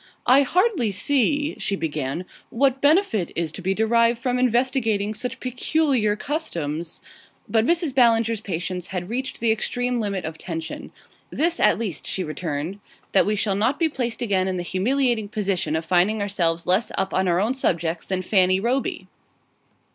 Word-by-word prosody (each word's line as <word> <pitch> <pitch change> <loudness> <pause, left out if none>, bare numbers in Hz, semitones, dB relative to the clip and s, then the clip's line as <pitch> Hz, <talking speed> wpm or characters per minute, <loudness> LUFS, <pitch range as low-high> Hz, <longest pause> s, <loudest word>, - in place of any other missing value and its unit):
"I 260 +3 +6
hardly 360 - +2
see," 285 +7 +1
she 200 - -1
began, 155 -1 -3 0.2
"what 270 +2 +1
benefit 285 - +3
is 165 -2 -2
to 190 - -8
be 190 +2 0
derived 230 +2 +3
from 250 +1 -1
investigating 235 -4 +1
such 250 +3 -5
peculiar 255 -3 +1
customs 170 - -4 0.2
" - - -34
But 225 +1 +2
Mrs. 335 -4 +1
Ballinger's 230 -3 +3
patience 180 -2 -4
had 180 0 -5
reached 255 +2 -3
the 230 -1 +2
extreme 245 +2 -1
limit 200 -5 -2
of 160 0 -6
tension. 165 -2 -6 0.4
"This 335 +2 0
at - - +4
least," 205 -9 -4
she 190 - -2
returned; 155 +3 -4 0.3
"that 195 - +4
we 210 - +1
shall 200 -1 0
not 220 +8 +1
be 330 -2 +2
placed 245 -5 -3
again 190 -4 +1
in 185 -1 -1
the 175 - -3
humiliating 230 +3 0
position 195 -6 -1
of 160 0 -2
finding 185 +6 +2
ourselves 175 -5 0
less 185 +6 +3
up 190 0 -1
on 190 0 +1
our 175 0 +2
own 220 +6 +1
subjects 170 -9 -1
than 185 -1 -2
Fanny 185 -1 +3
Roby!" 245 +6 -1
215 Hz, 170 wpm, -23 LUFS, 180-250 Hz, 0.4 s, I